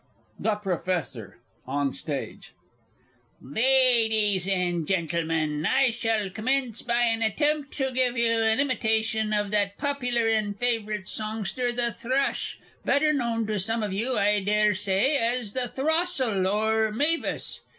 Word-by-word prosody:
THE 220 Hz, -1 st, +1 dB
PROFESSOR 175 Hz, -, -3 dB, 0.3 s
(on 140 Hz, 0 st, -1 dB
Stage). 145 Hz, -4 st, -5 dB, 0.9 s
Ladies 220 Hz, -, +2 dB
and 175 Hz, -4 st, 0 dB
Gentlemen, 160 Hz, -4 st, -1 dB
I 260 Hz, +7 st, +3 dB
shall 225 Hz, -4 st, -1 dB
commence 245 Hz, +2 st, -1 dB
by 240 Hz, 0 st, +1 dB
an 230 Hz, -1 st, +1 dB
attempt 290 Hz, +6 st, 0 dB
to 265 Hz, -2 st, -1 dB
give 255 Hz, -1 st, 0 dB
you 235 Hz, 0 st, +2 dB
an 220 Hz, +1 st, +2 dB
imitation 220 Hz, -5 st, 0 dB
of 205 Hz, -1 st, 0 dB
that 200 Hz, -1 st, 0 dB
popular 245 Hz, -5 st, 0 dB
and 215 Hz, -2 st, 0 dB
favourite 215 Hz, -5 st, -1 dB
songster 220 Hz, +3 st, -3 dB
the 240 Hz, -1 st, 0 dB
Thrush 260 Hz, +4 st, -1 dB, 0.3 s
better 305 Hz, +2 st, +2 dB
known 235 Hz, -5 st, -1 dB
to 210 Hz, -1 st, -2 dB
some 225 Hz, +4 st, -1 dB
of 205 Hz, -2 st, -3 dB
you, 235 Hz, +6 st, -1 dB
I 205 Hz, +1 st, +3 dB
dare 210 Hz, +1 st, +3 dB
say, 205 Hz, +8 st, +1 dB
as 235 Hz, -3 st, -1 dB
the 255 Hz, -1 st, -1 dB
Throstle, 270 Hz, -, 0 dB
or 220 Hz, +2 st, +1 dB
Mavis! 300 Hz, +9 st, 0 dB
220 Hz, 135 wpm, -26 LUFS, 200-250 Hz, 0.9 s, I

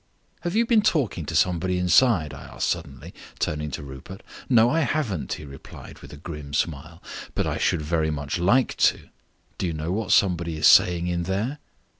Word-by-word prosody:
"Have 175 Hz, +3 st, -4 dB
you 230 Hz, +1 st, +3 dB
been 230 Hz, -2 st, +4 dB
talking 130 Hz, -, 0 dB
to 80 Hz, -, -4 dB
somebody 90 Hz, +2 st, +1 dB
inside?" 90 Hz, -, +3 dB
I 70 Hz, -, -10 dB
asked -, -, -3 dB
suddenly, 80 Hz, -1 st, -5 dB, 0.2 s
turning 75 Hz, 0 st, -2 dB
to 70 Hz, -, -6 dB
Rupert. 70 Hz, +8 st, -10 dB, 0.3 s
"No, 115 Hz, -3 st, +5 dB
I 160 Hz, +7 st, +1 dB
haven't," 135 Hz, -, -1 dB
he 75 Hz, -, -7 dB
replied, 70 Hz, -1 st, -12 dB
with -, -, -13 dB
a 75 Hz, -, -10 dB
grim 75 Hz, -2 st, -7 dB
smile, 80 Hz, +2 st, -3 dB, 0.3 s
"but -, -, 0 dB
I -, -, -2 dB
should 75 Hz, -, 0 dB
very 80 Hz, 0 st, 0 dB
much 75 Hz, +1 st, -3 dB
like 115 Hz, +9 st, +2 dB
to. -, -, +1 dB, 0.5 s
Do 95 Hz, -, -1 dB
you 85 Hz, -, -2 dB
know 80 Hz, +2 st, -4 dB
what 110 Hz, +3 st, -2 dB
somebody 85 Hz, -4 st, +2 dB
is 75 Hz, -, 0 dB
saying 85 Hz, -1 st, +5 dB
in 90 Hz, -1 st, -1 dB
there?" 110 Hz, -, -2 dB
85 Hz, 190 wpm, -24 LUFS, 75-105 Hz, 0.5 s, No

